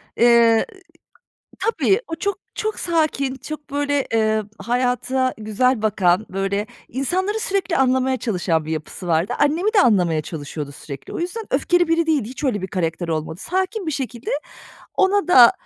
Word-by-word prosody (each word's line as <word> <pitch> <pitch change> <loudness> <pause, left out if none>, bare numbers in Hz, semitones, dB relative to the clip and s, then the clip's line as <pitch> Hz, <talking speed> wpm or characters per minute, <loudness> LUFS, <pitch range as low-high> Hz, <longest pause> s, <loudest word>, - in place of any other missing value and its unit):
Eee, 235 -1 +5 0.9
tabii, 455 -2 +2
o 325 - -2
çok, 400 +2 -1 0.2
çok 435 0 -2
sakin, 310 -5 0
çok 295 +2 -8
böyle, 285 -1 0
eee, 220 -1 +2 0.2
hayata 250 +1 0
güzel 220 +2 +1
bakan, 195 -2 +2
böyle, 195 +2 -1 0.2
insanları 375 - -1
sürekli 395 -5 0
anlamaya 260 0 +2
çalışan 180 -9 0
bir 160 - -4
yapısı 160 +3 -6
vardı. 170 +7 +1
Annemi 330 +9 +2
de 400 - +7
anlamaya 175 - +3
çalışıyordu 145 -2 -6
sürekli. 140 -1 -9
O - - -4
yüzden 365 +6 -3
öfkeli 350 -1 +2
biri 330 0 +2
değildi, 290 -9 +1
hiç 260 +4 -7
öyle 210 -8 0
bir - - -2
karakter 170 -1 -2
olmadı. 160 +3 -3
Sakin 375 +2 -2
bir 315 - -1
şekilde 250 -3 -4 0.7
ona 395 0 +3
da, 245 -9 +8
255 Hz, 155 wpm, -21 LUFS, 195-330 Hz, 0.9 s, da